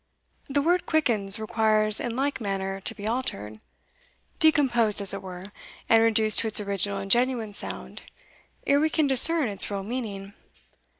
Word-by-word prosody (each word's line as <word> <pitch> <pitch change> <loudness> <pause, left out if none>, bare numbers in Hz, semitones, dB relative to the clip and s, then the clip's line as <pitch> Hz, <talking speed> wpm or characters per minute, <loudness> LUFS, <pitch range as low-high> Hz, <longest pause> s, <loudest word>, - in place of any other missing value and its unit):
The 280 +1 -1
word 350 +3 0
Quickens 220 -10 +2
requires 215 -1 0
in 235 -2 -5
like 270 0 -3
manner 195 -2 -4
to - - -5
be 205 - -9
altered, 110 - -5 0.8
decomposed, 250 -10 +3
as 200 -2 +3
it - - -6
were, 185 +1 -10 0.4
and 225 0 +4
reduced 220 -1 +4
to 230 - -1
its 215 - +5
original 200 -1 -1
and 195 0 -6
genuine 240 -3 0
sound, - - -8 0.6
ere 280 0 +2
we 315 +1 +1
can 315 -1 0
discern 285 +2 +4
its 200 -2 -2
real 200 -1 -5
meaning. 205 -4 -7
220 Hz, 160 wpm, -24 LUFS, 200-260 Hz, 0.8 s, its